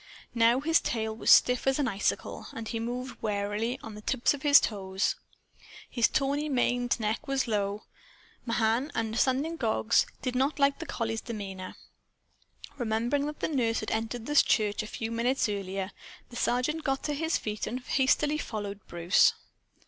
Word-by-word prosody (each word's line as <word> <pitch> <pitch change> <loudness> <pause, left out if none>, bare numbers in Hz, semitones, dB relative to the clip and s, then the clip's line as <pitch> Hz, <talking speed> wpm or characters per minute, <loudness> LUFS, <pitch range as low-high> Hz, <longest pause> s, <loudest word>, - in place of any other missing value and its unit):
Now 235 +2 +4
his 325 +3 +3
tail 220 -2 -2
was 225 - -2
stiff 250 +1 +6
as 270 - +3
an 285 -3 +1
icicle, 200 -3 -2
and 225 -1 -6
he 230 - -3
moved 250 +3 -5
warily, 210 +4 -2
on 225 - -8
the 210 - -9
tips 245 +5 +1
of 285 - -7
his 285 -1 +8
toes. 190 -2 -1 0.8
His 235 -2 +3
tawny 285 +2 0
maned 245 -2 +1
neck 220 +7 -2
was 275 -1 0
low. 205 -1 -1 0.6
Mahan, 230 +4 0
understanding 260 +8 0
dogs, 220 -3 +2 0.2
did 255 -1 -2
not 270 +4 +1
like 280 -1 +2
the 330 - -6
collie's 225 -4 -2
demeanor. 195 -5 -6 1.0
Remembering 240 +5 0
that 300 - -7
the - - +1
nurse 235 -7 0
had 215 - -4
entered 225 +1 -2
the 295 - -3
church 210 -7 +3
a 215 - -6
few 225 +1 -5
minutes 240 +3 +1
earlier, 195 -1 -3 0.4
the - - -10
Sergeant 255 +7 0
got 270 -1 -1
to 295 - -1
his 320 +3 0
feet 210 -1 -4
and 250 - -3
hastily 290 +4 +1
followed 205 -6 -5
Bruce. 175 +1 +4
235 Hz, 165 wpm, -29 LUFS, 215-270 Hz, 1.0 s, his